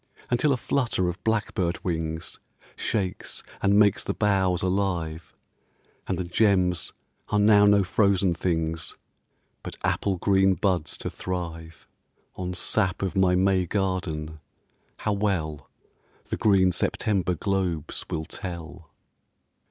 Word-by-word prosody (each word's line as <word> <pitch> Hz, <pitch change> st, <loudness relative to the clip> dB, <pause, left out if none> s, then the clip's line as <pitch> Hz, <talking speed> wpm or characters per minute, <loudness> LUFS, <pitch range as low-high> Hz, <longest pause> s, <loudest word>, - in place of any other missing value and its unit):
Until 135 Hz, +5 st, +3 dB
a 130 Hz, -, +2 dB
flutter 115 Hz, -8 st, 0 dB
of 90 Hz, -, -7 dB
blackbird 100 Hz, -6 st, -1 dB
wings 80 Hz, -2 st, -3 dB, 0.4 s
Shakes 95 Hz, -4 st, -3 dB, 0.2 s
and 100 Hz, 0 st, +4 dB
makes 105 Hz, -2 st, +4 dB
the -, -, -3 dB
boughs 95 Hz, -4 st, +2 dB
alive, 90 Hz, -4 st, -1 dB, 0.7 s
And -, -, -1 dB
the 90 Hz, -, -1 dB
gems 90 Hz, -2 st, +2 dB, 0.4 s
are 105 Hz, -, +1 dB
now 105 Hz, 0 st, +6 dB
no 100 Hz, -1 st, +5 dB
frozen 95 Hz, -1 st, +2 dB
things, 80 Hz, -2 st, -2 dB, 0.6 s
But -, -, -7 dB
apple 95 Hz, -2 st, 0 dB
green 95 Hz, +1 st, +3 dB
buds 90 Hz, -6 st, 0 dB
to -, -, -4 dB
thrive 85 Hz, -3 st, -6 dB, 0.5 s
On 90 Hz, -1 st, -4 dB
sap 90 Hz, +1 st, 0 dB
of 95 Hz, -, -2 dB
my 95 Hz, -1 st, +4 dB
May 95 Hz, -1 st, +2 dB
garden, 80 Hz, -5 st, -2 dB, 0.6 s
how 105 Hz, -, -1 dB
well 85 Hz, -8 st, -2 dB, 0.6 s
The -, -, -3 dB
green 95 Hz, -4 st, +4 dB
September 95 Hz, 0 st, 0 dB
globes 90 Hz, -4 st, -2 dB
will 80 Hz, 0 st, -3 dB
tell. 85 Hz, -2 st, -8 dB
95 Hz, 120 wpm, -26 LUFS, 85-100 Hz, 0.7 s, now